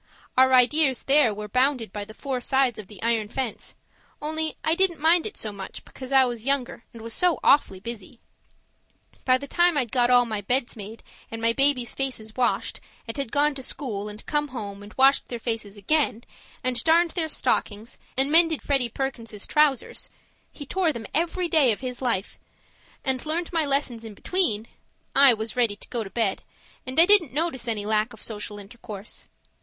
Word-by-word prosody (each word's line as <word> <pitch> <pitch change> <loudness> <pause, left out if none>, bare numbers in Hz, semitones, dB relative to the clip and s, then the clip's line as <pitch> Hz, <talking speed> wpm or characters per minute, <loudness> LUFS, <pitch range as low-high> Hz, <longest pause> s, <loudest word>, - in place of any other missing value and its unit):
Our 260 0 +5
ideas 260 +1 +3
there 275 -4 +4
were 210 0 -6
bounded 250 -2 0
by 205 -1 -5
the 215 - -13
four 265 -3 -4
sides 265 -2 +1
of 205 - -9
the 210 -2 -13
iron 230 -2 +1
fence, 255 -2 -4 0.4
only 315 +1 -2
I 315 - +2
didn't 350 -1 +2
mind 330 +4 +4
it 420 - -8
so 215 - -4
much 195 -1 -9
because 260 0 -10
I 265 -1 +6
was 240 -3 -4
younger, 265 -3 -1
and 230 -1 -11
was 230 0 -4
so 355 +3 +2
awfully 195 -9 +3
busy. 230 +2 -7 1.1
By 255 -1 +4
the 280 - -8
time 345 +1 +2
I'd 245 -6 0
got 245 -1 +3
all 245 -1 +5
my 215 -3 -3
beds 245 +4 0
made 215 +1 -9 0.3
and 225 - -6
my 230 0 +2
babies' 270 -3 +1
faces 240 -5 -3
washed 250 -1 0 0.3
and 225 - -5
had 275 -5 -3
gone 290 +1 +2
to 275 - -7
school 210 -6 -4
and 210 +1 -10
come 295 0 0
home 205 -7 -7
and 205 +1 -12
had - - -20
washed 270 +1 +4
their 240 - -5
faces 225 -3 -4
again 250 +1 0 0.4
and 250 -2 -1
darned 335 +1 +4
their 325 -3 -2
stockings 220 -5 -2 0.2
and 270 +2 +2
mended 325 -1 +5
Freddie 270 -4 +1
Perkins's 230 -5 -5
trousers 300 -4 +1 0.4
(he 290 - -9
tore 355 +2 0
them 235 -6 -7
every 345 +3 0
day 305 -7 +4
of 215 - -3
his 250 -1 -5
life) 230 -7 -1 0.7
and 260 -2 0
learned 330 +3 -2
my 325 -2 +1
lessons 275 -5 -1
in 220 -2 -9
between 230 - +1 0.5
I 275 -3 +7
was 220 +2 -5
ready 235 -4 +2
to - - -12
go 235 -2 -2
to 195 - -9
bed, 215 -3 0 0.5
and 260 +4 0
I 335 - +9
didn't 360 -9 +5
notice 290 -5 -1
any 215 -3 -2
lack 215 +2 0
of - - -12
social 210 -1 -2
intercourse. 205 0 -9
250 Hz, 195 wpm, -25 LUFS, 220-290 Hz, 1.1 s, I